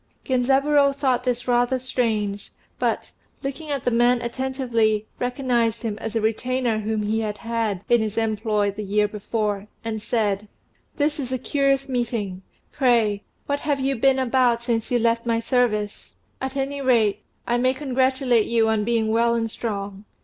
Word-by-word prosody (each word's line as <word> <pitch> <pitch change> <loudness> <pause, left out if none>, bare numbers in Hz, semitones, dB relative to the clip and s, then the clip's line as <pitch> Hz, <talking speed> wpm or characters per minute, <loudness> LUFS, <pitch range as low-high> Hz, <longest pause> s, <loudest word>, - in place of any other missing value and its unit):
Genzaburô 275 +2 +3
thought 260 -3 0
this 245 -1 -1
rather 245 +1 +2
strange; 220 -5 -2 0.3
but, - - -1 0.3
looking 280 +3 -5
at 280 -3 -2
the 245 - +2
man 240 +1 +4
attentively, 235 -4 0
recognized 245 -2 0
him 220 -3 -2
as 225 0 -5
a 225 - +1
retainer 235 +1 0
whom 215 0 -1
he 215 +2 0
had 210 -2 -3
had 225 -4 -2
in 240 -1 +4
his 215 0 -3
employ 215 -2 +1
the 205 +2 -7
year 210 +1 +2
before, 210 -1 -2 0.2
and 220 -1 -3
said 210 -2 -1 0.5
"This 295 +1 +1
is 260 -3 -4
a 260 - 0
curious 275 +1 +1
meeting: 230 -7 -2 0.3
pray, 230 -6 +2 0.2
what 285 0 -1
have 290 -2 -1
you 270 +1 0
been 265 +3 +3
about 250 -2 +2
since 230 -2 -1
you 245 - +2
left 230 0 +1
my 230 -1 +2
service? 220 -4 -1 0.3
At 265 +1 -3
any 275 +1 -2
rate, 230 -6 +3 0.2
I 240 0 +1
may 255 +1 +2
congratulate 260 -3 +1
you 225 -1 +3
on 220 -1 +1
being 225 -1 +1
well 235 +1 +3
and 225 -1 -1
strong. 200 -3 -4
235 Hz, 165 wpm, -23 LUFS, 215-260 Hz, 0.5 s, man